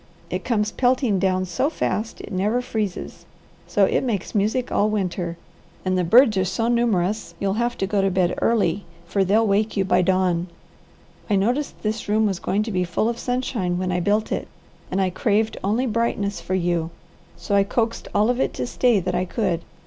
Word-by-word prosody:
It - - -2
comes 215 -3 0
pelting 250 -5 +2
down 185 0 +1
so 185 - 0
fast 220 -8 -2
it - - -9
never 210 +6 +1
freezes, 215 -6 -4 0.4
so - - +3
it - - +1
makes 215 -7 -2
music 220 +4 0
all 210 - +2
winter, 180 -4 -2 0.5
and 185 0 +1
the 180 - +1
birds 225 +4 +5
are 190 - +3
so 190 +5 -1
numerous 215 -4 0
you'll 195 -1 0
have 240 0 -1
to - - 0
go 200 0 +1
to 195 - +2
bed 180 -1 +1
early 205 -4 +1 0.2
for 195 +3 +1
they'll 210 +4 +3
wake 210 +1 +1
you 195 - +2
by 185 - +3
dawn. 180 -1 +1 0.8
I 205 - +3
noticed 245 +9 -1
this 215 0 -2
room 215 +1 +3
was 195 -3 -1
going 205 +2 0
to 225 - -4
be 180 -2 +1
full 180 +5 0
of 235 0 -4
sunshine 240 -8 -1
when 185 0 -1
I 180 - 0
built 205 +4 +1
it, - - -2 0.4
and 185 - -1
I 190 -1 +1
craved 215 +3 0
only 220 +6 +1
brightness 210 -5 -1
for 180 +3 -2
you, 170 -2 0 0.5
so - - -4
I 200 0 +5
coaxed 230 +3 -1
all 215 +4 +4
of 250 - -3
it - - 0
to - - -2
stay 240 -3 +2
that 180 0 -2
I 180 +1 0
could. 185 -4 -1
205 Hz, 200 wpm, -23 LUFS, 185-225 Hz, 0.8 s, birds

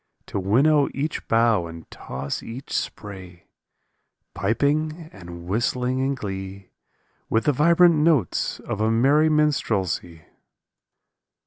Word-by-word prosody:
To - - -4
winnow 140 +10 +3
each 150 +3 -3
bough 115 -6 +2
and 80 -1 -10
toss 65 +2 -5
each 125 +4 -8
spray, 95 -4 -6 0.9
Piping 150 - -1
and 85 -3 -10
whistling 125 +6 -1
in 135 +1 0
glee 95 -3 -7 0.6
With 115 0 +1
the 150 - +3
vibrant 170 +5 +5
notes 150 - +1
of 105 - -4
a 110 - +2
merry 140 +7 +4
minstrelsy. 100 - 0
115 Hz, 110 wpm, -23 LUFS, 95-150 Hz, 0.9 s, vibrant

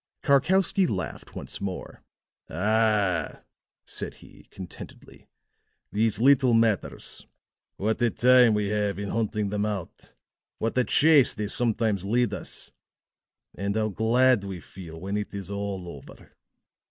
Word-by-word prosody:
Karkowsky 180 +6 +3
laughed 95 - -5
once - - -7
more. 95 -2 -6 0.5
"Ah," 105 -2 +1 0.4
said - - -5
he, - - -17
contentedly, 95 -2 -11 0.6
"these 110 +1 +1
little 130 -1 +5
matters! 115 -3 0 0.5
What 110 +4 -1
a 120 - +4
time 125 -2 +5
we 105 -1 0
have 105 -2 -1
in 100 0 -4
hunting 105 -2 -1
them 105 0 -1
out 105 -5 -5 0.4
what 115 - -2
a 125 - +2
chase 150 -4 +5
they 105 - -3
sometimes 110 -2 0
lead 120 +4 +1
us. - - -5 0.8
And 100 +2 -3
how 110 -1 +1
glad 115 +2 +3
we 95 -2 -6
feel 80 0 -11
when 100 +4 -3
it 105 -1 -5
is 100 0 -6
all 100 -3 -4
over." 70 -5 -12
105 Hz, 130 wpm, -26 LUFS, 100-120 Hz, 0.8 s, little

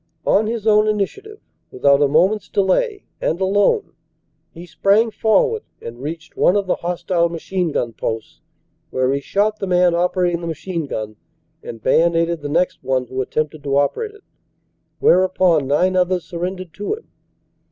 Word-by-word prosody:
On 215 +2 +3
his 225 -1 -3
own 215 -1 +4
initiative, 400 - -3 0.3
with 130 - -10
out 140 0 +6
a 145 - +5
moment 180 +9 +3
s - - -23
delay, 400 - +1 0.2
and 165 - -1
alone, 205 - +1 0.6
he 170 +2 -11
sprang 205 +6 +2
forward 445 - +2 0.2
and 120 +1 -9
reached 160 +3 -7
one 180 - +3
of 200 -1 +1
the 185 - 0
hostile 175 0 0
machine 170 +1 -2
gun 120 -4 -2
posts, 110 0 -5 0.5
where 130 +1 0
he 140 - 0
shot 210 +7 0
the 195 - -3
man 180 -1 +3
operating 175 0 +1
the 170 - -5
machine 165 0 -4
gun 110 -4 -5 0.4
and 115 -2 -9
bayonetted 165 0 +2
the 145 - -5
next 175 +4 0
one 130 -1 0
who 130 +2 -3
attempted 155 +3 -3
to 140 -1 0
operate 420 - -1
it, 420 - -19 0.7
whereupon 180 -5 +3
nine 180 +7 +2
others 180 -1 +1
sur 170 - -7
rendered 185 -1 -4
to 205 - -3
him. 450 - -16
180 Hz, 170 wpm, -20 LUFS, 150-200 Hz, 0.7 s, out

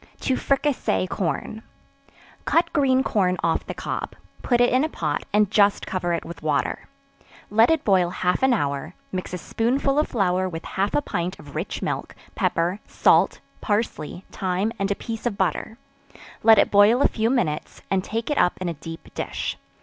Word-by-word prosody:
To 260 - +1
Fricassee 275 -7 0
Corn. 185 +4 -3 0.8
Cut 335 +1 +2
green 265 -3 +3
corn 185 -6 +1
off 165 - 0
the - - -5
cob; - - -4 0.3
put 240 -2 +2
it 245 0 +4
in 255 +3 +4
a 315 - 0
pot, 150 - -2
and 210 -1 +3
just 205 -1 +3
cover 180 -2 -2
it 170 - -2
with 170 - -9
water; 155 - -1 0.6
let 225 +2 +5
it 325 -2 +2
boil 185 -4 +3
half 180 0 0
an 265 0 +4
hour; 145 - -1 0.2
mix 185 -1 -4
a 180 - -3
spoonful 270 - 0
of 305 - +2
flour 185 -4 +1
with 165 -1 -7
half 195 +2 -1
a 295 - +2
pint 175 -3 -3
of 145 -1 -13
rich - - -4
milk, - - -3 0.2
pepper, 175 +4 0
salt, - - +3 0.2
parsley, 205 -5 -2
thyme 190 +3 -1
and 195 0 0
a 200 - +1
piece 225 +2 -4
of 205 -4 -3
butter; 220 +1 -1 0.6
let 225 -1 +7
it - - +4
boil 210 +6 +6
a - - +6
few 225 0 0
minutes, 180 - -1
and 190 -1 +2
take 225 +7 -3
it 295 - +1
up 180 - +3
in 185 - -3
a 170 - -1
deep 165 +2 -10
dish. - - -3
200 Hz, 185 wpm, -24 LUFS, 180-240 Hz, 0.8 s, let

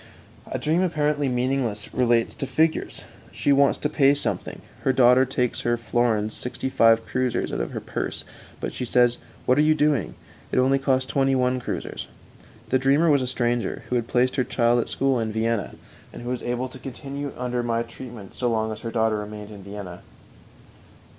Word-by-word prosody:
A - - -2
dream 160 +4 +1
apparently 150 -5 +1
meaningless 125 -4 -1
relates 120 -2 +2
to 135 - -5
figures. 160 +3 0 0.3
_"She 145 - +2
wants 140 0 +4
to - - -1
pay 140 -1 +4
something; 145 - -3 0.2
her 135 - +2
daughter 130 0 +5
takes 125 -2 -1
three 120 0 +1
florins 115 -2 0
sixty 125 +1 -4
five 115 -2 +4
kreuzers 125 -2 -1
out - - -1
of - - -3
her - - -4
purse; - - -4 0.4
but - - -4
she - - -4
says: 120 0 +3 0.3
'What 130 +3 +3
are - - +7
you 155 +1 +4
doing? 145 -7 +1 0.4
It - - -1
only 135 +2 +4
cost 130 -1 +1
twenty 135 0 +2
one 125 0 +1
kreuzers.'"_ - - -5 0.6
The 130 - +3
dreamer 140 +5 +4
was 140 -2 +4
a 130 - -2
stranger 120 -2 -1
who 125 - 0
had 120 -1 0
placed 125 +2 +1
her 130 - +3
child 120 -1 +2
at - - -2
school 135 -2 +1
in 110 -1 -1
Vienna, 110 0 -1 0.4
and - - -9
who 120 - -4
was 125 -1 -2
able 125 +1 -2
to 130 - -11
continue 140 +2 -6
under 125 0 -1
my 115 -1 0
treatment 115 -3 -10
so 125 - -1
long 110 -1 0
as 110 - -6
her 115 - -5
daughter 110 -2 +1
remained 105 0 -7
at 105 - -10
Vienna. 100 -2 -8
125 Hz, 195 wpm, -24 LUFS, 115-135 Hz, 0.6 s, are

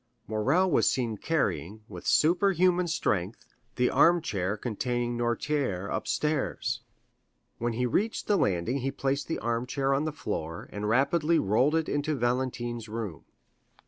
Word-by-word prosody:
Morrel 135 - +2
was - - +4
seen 120 -4 -1
carrying, 105 - -2
with - - -9
superhuman 180 +1 +3
strength, 105 - -1 0.3
the 125 0 +2
armchair 110 - +2
containing 120 +2 -2
Noirtier 120 -4 -1
upstairs. 150 -2 -1 0.8
When 120 0 -1
he 125 +2 0
reached 210 - 0
the 210 - +2
landing 100 - +1
he 135 +1 -1
placed 140 +1 -2
the 165 - -2
armchair 125 +4 -1
on 140 +3 +1
the 155 - -1
floor 80 - -5
and 105 +1 -3
rapidly 150 +7 +3
rolled 125 +9 +2
it 160 -1 +1
into 145 +1 -1
Valentine's 120 -2 -2
room. 105 -9 -5
125 Hz, 135 wpm, -28 LUFS, 110-155 Hz, 0.8 s, was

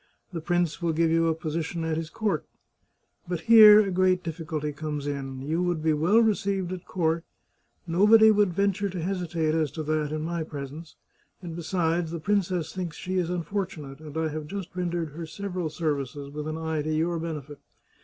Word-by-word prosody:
The 165 - -3
prince 175 -1 0
will 170 -1 +1
give 165 +1 +2
you 165 0 +3
a 160 - +1
position 165 +1 -3
at 160 -1 -1
his 160 0 -4
court. 215 +1 -1 0.8
But 175 -1 -3
here 215 -2 +9
a 195 -2 -1
great 185 0 +2
difficulty 160 -2 -4
comes 150 0 -4
in. 135 -2 -4
You 160 +5 -1
would 175 -3 -1
be 160 -1 +3
well 165 +9 +3
received 200 -4 0
at 180 -1 -7
court, 165 -2 0 0.6
nobody 210 +6 +6
would 205 -3 +3
venture 200 +2 0
to 180 -1 -5
hesitate 170 -3 -1
as 160 -2 +1
to 160 - -4
that 155 -1 -1
in 155 0 -2
my 170 0 -2
presence, 150 +1 -8 0.5
and 170 -2 -6
besides, 170 -1 0
the 170 0 -4
princess 185 -3 0
thinks 175 -5 -5
she 185 0 -2
is 175 -2 -1
unfortunate, 170 -5 -4
and 155 -1 -8
I 160 0 0
have 155 0 -5
just 195 0 -6
rendered 175 -2 -2
her 165 +2 -7
sev 200 +5 -6
eral 180 -3 -2
services 145 -3 -3
with 150 +1 -5
an 155 0 -3
eye 160 -1 -2
to 155 +1 -2
your 165 +2 0
benefit. 150 -3 -6
165 Hz, 195 wpm, -27 LUFS, 155-180 Hz, 0.8 s, here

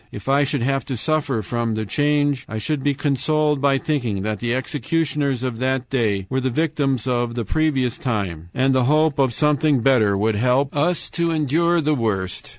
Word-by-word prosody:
If 105 - -9
I 140 +1 +3
should 140 -3 -1
have 135 +1 0
to 130 -3 -4
suffer 140 -4 -1
from 115 +1 -2
the 110 0 -3
change, 145 +2 +1
I 110 - -4
should 135 +6 -2
be 145 -1 +1
consoled 150 +1 0
by 140 -1 +3
thinking 120 -10 -2
that 105 -1 -2
the 120 -1 -2
executioners 140 0 -1
of 125 -3 -3
that 130 -1 -1
day 105 -7 0
were 130 - -1
the 130 0 -1
victims 140 -3 -1
of 120 -2 -1
the 120 -2 -3
previous 135 -3 0
time, 95 - -3
and 130 +4 +1
the 130 -1 +2
hope 155 +1 +2
of 135 -2 +3
something 150 0 +2
better 110 -6 +3
would 105 +1 0
help 130 +5 +1
us 165 +4 0
to 170 -1 0
endure 165 +2 +1
the 155 0 +1
worst. 100 -8 -2
130 Hz, 195 wpm, -21 LUFS, 115-150 Hz, -, I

